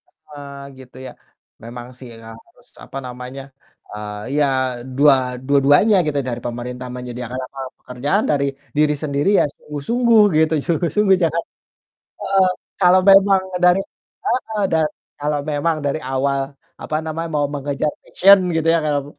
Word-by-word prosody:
Heeh, 140 Hz, -2 st, -12 dB, 0.2 s
gitu 130 Hz, -1 st, -14 dB
ya. -, -, -8 dB, 0.5 s
Memang 120 Hz, +1 st, -8 dB
sih, 125 Hz, -, -11 dB
emang 115 Hz, 0 st, -12 dB
harus -, -, -26 dB, 0.2 s
apa -, -, -8 dB
namanya, 125 Hz, +2 st, -8 dB, 0.5 s
eee, 105 Hz, 0 st, -6 dB
iya, 145 Hz, 0 st, +3 dB, 0.5 s
dua 145 Hz, 0 st, +6 dB, 0.3 s
dua-duanya 145 Hz, +9 st, +4 dB
gitu, 145 Hz, -1 st, 0 dB
dari 120 Hz, -1 st, -4 dB
pemerintah 125 Hz, +1 st, -5 dB
menyediakan 125 Hz, 0 st, -6 dB
lapangan 130 Hz, 0 st, -8 dB
pekerjaan, 145 Hz, -, -1 dB
dari 140 Hz, -1 st, +1 dB, 0.3 s
diri 150 Hz, 0 st, +3 dB
sendiri 145 Hz, +3 st, 0 dB
ya -, -, +4 dB
sungguh-sungguh, 230 Hz, -, +1 dB, 0.2 s
gitu, 160 Hz, 0 st, +3 dB
sungguh-sungguh, 190 Hz, +4 st, +2 dB
jangan 165 Hz, 0 st, 0 dB, 0.8 s
heeh, 195 Hz, -1 st, +3 dB, 0.3 s
kalau 185 Hz, 0 st, +6 dB
memang 195 Hz, 0 st, +6 dB, 0.2 s
dari 180 Hz, +2 st, +5 dB, 0.5 s
heeh. 220 Hz, -4 st, -1 dB
Da 165 Hz, -, +3 dB, 0.4 s
kalau 145 Hz, 0 st, -1 dB
memang 150 Hz, +2 st, 0 dB
dari 140 Hz, +2 st, -1 dB
awal 135 Hz, +1 st, 0 dB, 0.4 s
apa 155 Hz, -, -2 dB
namanya, 165 Hz, +1 st, -4 dB
mau 145 Hz, -1 st, +1 dB
mengejar 145 Hz, +1 st, -2 dB
passion 195 Hz, +2 st, +6 dB, 0.2 s
gitu 160 Hz, 0 st, 0 dB
ya, -, -, +3 dB
karam 145 Hz, -2 st, 0 dB
145 Hz, 140 wpm, -20 LUFS, 130-170 Hz, 0.8 s, dua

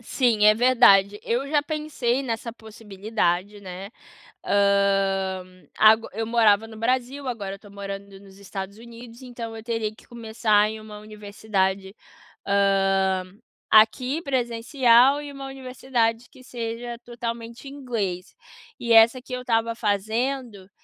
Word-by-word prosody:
Sim, 235 Hz, -3 st, +1 dB
é 215 Hz, -, +7 dB
verdade. 210 Hz, -5 st, +4 dB
Eu 250 Hz, +4 st, -1 dB
já 295 Hz, -1 st, +2 dB
pensei 290 Hz, -5 st, -2 dB
nessa 230 Hz, -2 st, -4 dB
possibilidade, 210 Hz, -3 st, -3 dB
né? 190 Hz, +1 st, -8 dB, 0.5 s
Hã, 195 Hz, -2 st, +1 dB, 0.3 s
ago 220 Hz, +1 st, +5 dB
eu 225 Hz, +2 st, -3 dB
morava 225 Hz, -2 st, +3 dB
no 220 Hz, -, -12 dB
Brasil, 255 Hz, +4 st, -1 dB
agora 205 Hz, -6 st, -4 dB
eu -, -, -9 dB
estou 205 Hz, +1 st, -17 dB
morando 200 Hz, 0 st, -8 dB
nos 195 Hz, -1 st, -17 dB
Estados 200 Hz, 0 st, -7 dB
Unidos, 235 Hz, +1 st, -13 dB
então, 235 Hz, -3 st, -8 dB
eu 220 Hz, -, -9 dB
teria 225 Hz, -2 st, -2 dB
que -, -, -20 dB
começar 220 Hz, -2 st, +1 dB
em 220 Hz, 0 st, -8 dB
uma 210 Hz, -1 st, -11 dB
universidade, 200 Hz, -2 st, -3 dB, 0.5 s
hã, 195 Hz, -1 st, +2 dB, 0.5 s
aqui 250 Hz, +8 st, +4 dB
presencial 250 Hz, 0 st, +3 dB
e 290 Hz, -1 st, -8 dB
uma 275 Hz, -1 st, -8 dB
universidade 250 Hz, -3 st, -2 dB
que 255 Hz, -, -17 dB
seja 235 Hz, 0 st, -6 dB
totalmente 235 Hz, +1 st, -7 dB
inglês. 225 Hz, -10 st, -4 dB, 0.5 s
E 235 Hz, -1 st, 0 dB
essa 225 Hz, +3 st, +6 dB
que 255 Hz, -, -13 dB
eu 250 Hz, -, -4 dB
estava 230 Hz, -1 st, 0 dB
fazendo, 220 Hz, 0 st, -2 dB
225 Hz, 130 wpm, -24 LUFS, 200-245 Hz, 0.5 s, é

